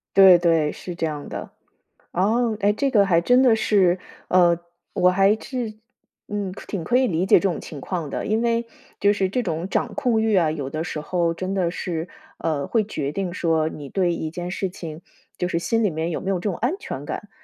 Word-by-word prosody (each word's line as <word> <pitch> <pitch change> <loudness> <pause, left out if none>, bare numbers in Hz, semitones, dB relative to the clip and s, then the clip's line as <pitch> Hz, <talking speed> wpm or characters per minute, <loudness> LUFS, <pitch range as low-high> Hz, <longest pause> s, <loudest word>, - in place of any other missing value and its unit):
对， 190 -2 +9
对， 165 -3 +2
是 180 - -7
这 165 -1 -2
样 150 -2 -5
的。 - - -6 0.6
哦， 220 +4 +1
哎， 205 +1 +3
这 275 +5 0
个 205 -5 +4
还 170 -3 +4
真 245 +8 +4
的 235 -4 +5
是 190 -4 +3 0.3
哦， 175 -2 +4 0.3
我 180 - +3
还 195 +3 +4
是， 245 -5 -4 0.6
嗯， 205 -3 -3
挺 180 -6 -4
可 245 +1 +3
以 260 - +3
理 175 -2 0
解 - - +6
这 195 - +1
种 170 - -3
情 145 -3 -8
况 165 -4 -4
的。 - - -3
因 220 +2 +1
为， 235 0 +1 0.3
就 200 - +4
是 195 -2 0
这 250 +4 0
种 170 -2 -2
掌 - - -1
控 250 -6 +1
欲 220 -2 +2
啊， 165 -4 +3
有 145 -4 -4
的 155 +3 -3
时 155 - -4
候 170 +2 0
真 185 +3 -4
的 180 -3 +1
是， 170 -1 -4 0.3
呃， 145 -4 -1
会 220 -3 +1
决 145 -9 -3
定 185 +2 -3
说， 160 -3 +1
你 145 -3 -8
对 180 +2 +1
一 160 -1 -4
件 175 +1 -5
事 190 +1 -2
情， 165 -3 -8 0.4
就 180 - 0
是 170 - 0
心 225 +6 0
里 210 - +3
面 160 0 -2
有 - - -3
没 190 - -5
有 190 - +1
这 200 +4 -2
种 175 - -4
安 245 - 0
全 - - -6
感。 - - -5
185 Hz, 240 characters per minute, -23 LUFS, 165-210 Hz, 0.6 s, 对